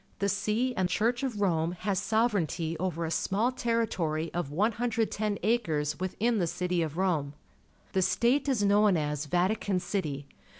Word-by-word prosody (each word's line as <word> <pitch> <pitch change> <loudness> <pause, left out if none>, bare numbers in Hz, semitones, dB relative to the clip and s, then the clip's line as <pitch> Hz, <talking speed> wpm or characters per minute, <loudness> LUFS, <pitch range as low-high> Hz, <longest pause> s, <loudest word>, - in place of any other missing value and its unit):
The 200 0 0
See 215 +6 0
and 185 -1 0
Church 235 +6 +1
of 245 -7 -3
Rome 170 -3 +1
has 190 -1 0
sovereignty 195 -8 0
over 170 -2 -2
a 160 - -3
small 210 +8 +1
territory 200 -11 -1
of 175 -5 -2
110 215 +3 0
acres 160 -10 0
within 215 +5 0
the 175 - +1
city 180 +1 -1
of 160 -1 -3
Rome. 160 -7 0 0.6
The 190 - +2
state 255 +9 +2
is 240 -6 +1
known 205 -2 +4
as 150 -1 -2
Vatican 185 +4 +1
City. 175 -7 -3
190 Hz, 155 wpm, -29 LUFS, 165-220 Hz, 0.6 s, known